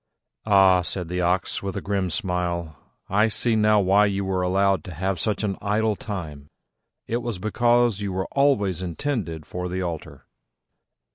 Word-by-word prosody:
"Ah," 95 -3 +5
said 90 -1 -4
the 90 0 -1
Ox, 90 +1 0
with 95 -1 -4
a - - 0
grim 100 -2 -1
smile, 85 -2 -2 0.3
"I 105 +3 +3
see 115 +1 +2
now 105 -1 +4
why 100 +2 +4
you 100 -1 -2
were 95 -1 -1
allowed 95 +1 +2
to 90 - -7
have 95 +1 -2
such 105 +5 -1
an 100 -2 -2
idle 105 +1 +1
time: 80 -10 -7 0.6
it 115 - -1
was 120 -4 -4
because 120 +1 +2
you 100 -1 -2
were 95 0 -2
always 110 - +2
intended 90 - -3
for 90 +2 -5
the 90 +1 -2
altar." 80 -4 -6
95 Hz, 165 wpm, -24 LUFS, 90-105 Hz, 0.6 s, Ah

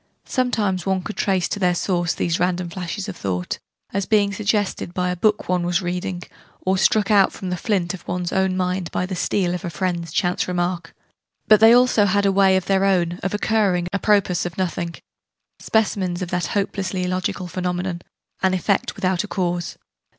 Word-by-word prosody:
Sometimes 210 -8 0
one 190 -1 0
could 215 - -6
trace 190 -3 +1
to 205 - -3
their 180 -2 +2
source 175 -1 0
these 170 0 0
random 180 -1 0
flashes 185 +3 -4
of 200 - -5
thought 90 - -3 0.3
as 195 -1 -1
being 205 -2 +3
suggested 200 -3 -1
by 180 0 0
the - - -2
book 210 +4 +1
one 180 -1 +1
was 175 +2 0
reading, 180 0 -3 0.4
or 190 +1 +1
struck 205 +2 +2
out 200 -2 +5
from 185 -2 -6
the - - 0
'flint' 180 -1 -1
of 190 - -10
one's 180 0 -2
own 190 -1 +1
mind 180 -1 -1
by 180 - -1
the 185 0 -4
'steel' 180 0 0
of 180 - -4
a 175 - -3
friend's 170 -1 -2
chance 175 +2 0
remark 175 0 -2 0.5
but 215 -1 +7
they 225 +1 +8
had 235 - +8
also 245 -4 +4
a 200 +1 +2
way 190 -1 +4
of 185 - -2
their 195 0 +2
own, 175 -2 +1
of 195 +1 -2
occurring, 205 -5 +1
a 200 - 0
propos 200 -5 +2
of 175 -1 -5
nothing 170 -2 -2 0.6
specimens 190 -4 0
of 175 - -5
that 175 -1 0
hopelessly 195 -2 -2
illogical 185 0 -2
phenomenon, 180 0 -3 0.4
'an 190 -1 +2
effect 195 +2 0
without 185 -2 0
a - - -6
cause.' 175 -3 -2
185 Hz, 195 wpm, -22 LUFS, 175-200 Hz, 0.6 s, they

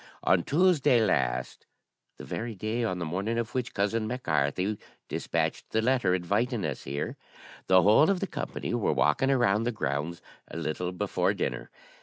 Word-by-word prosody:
On 95 -2 +4
Tuesday 150 - +3
last, 60 - -1 0.5
the - - -9
very 115 0 -4
day 110 +4 -2
on 95 -5 -1
the 85 - -3
morning 100 +8 -2
of 115 0 -3
which 125 -2 -3
cousin 110 +2 0
Mac 125 +2 -4
Carthy 95 - 0 0.3
despatched - - -2
the 110 - 0
letter 120 -5 +2
inviting 105 +5 0
us 75 -5 -4
here, 70 +3 -4 0.5
the 95 -1 +6
whole 110 - +6
of 195 -2 +2
the 195 - -1
company - - -5
were - - +1
walking 105 - +2
about 115 -5 +3
the 120 - 0
grounds 75 - -3 0.3
a - - -7
little 85 +2 -2
before 95 0 0
dinner. - - -3
105 Hz, 170 wpm, -28 LUFS, 90-120 Hz, 0.5 s, the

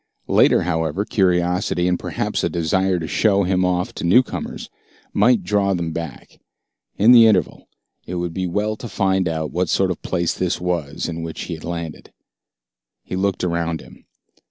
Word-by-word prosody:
Later, - - +4
however, 80 +2 -1
curiosity 90 -2 +1
and 90 -1 +1
perhaps - - -2
a - - +1
desire 90 +3 0
to 80 -2 -4
show 100 +1 +2
him 95 0 +1
off 90 0 0
to - - -7
newcomers 110 +9 +1 0.5
might 110 -1 +3
draw 100 +1 +1
them 85 -2 -3
back. 85 -6 -7 0.6
In 110 +4 +6
the 115 -2 +8
interval, 110 - +1 0.4
it 90 - -4
would 85 -1 -3
be 95 +1 -2
well 105 +4 -1
to 120 - -8
find 95 -2 +1
out 80 -1 -2
what 90 +1 -1
sort 95 -1 +2
of 90 - -5
place 85 -2 -1
this 90 -1 -1
was 85 -5 -2
in 85 -1 -5
which 80 -1 -6
he 90 - -5
had 80 - -8
landed. 85 -2 -6 0.9
He - - -6
looked 95 0 -1
around 85 -2 -1
him. - - -16
90 Hz, 175 wpm, -21 LUFS, 85-95 Hz, 0.9 s, the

